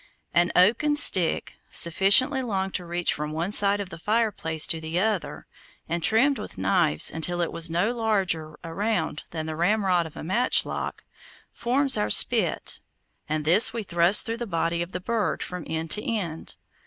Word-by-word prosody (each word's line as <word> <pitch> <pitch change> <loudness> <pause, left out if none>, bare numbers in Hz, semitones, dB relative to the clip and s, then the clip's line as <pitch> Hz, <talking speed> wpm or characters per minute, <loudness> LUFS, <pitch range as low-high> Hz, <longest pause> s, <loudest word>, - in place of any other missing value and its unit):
An 175 0 +2
oaken 235 +11 +3
stick, 185 - +3 0.2
sufficiently 200 - +4
long 195 -6 -3
to 180 -2 -4
reach 175 0 -1
from 150 +1 -5
one 170 +5 -3
side 205 0 +3
of 195 -2 -6
the 165 - -10
fireplace 205 -7 0
to 160 - -2
the 160 +2 -3
other, 210 -2 -3 0.4
and 170 +1 -3
trimmed 255 - +2
with - - -9
knives 175 -6 +3
until 175 +2 -3
it 170 - -2
was 165 0 +1
no 175 +7 0
larger 185 -9 -2
around 175 -2 -3
than 160 -2 -6
the 160 0 -5
ramrod 180 -1 0
of 155 - -15
a - - -8
matchlock, 215 +10 -1 0.5
forms 270 +3 +1
our 105 - -1
spit, - - +2 0.5
and 155 0 -3
this 185 +10 +5
we 230 -2 -4
thrust 175 +1 +1
through 230 0 -4
the 240 0 -6
body 170 -1 -2
of 170 +1 -6
the 180 - -5
bird 215 +2 -2
from 180 -2 -7
end 160 0 -4
to 210 - +2
end. 180 -8 -5
180 Hz, 175 wpm, -24 LUFS, 165-215 Hz, 0.5 s, this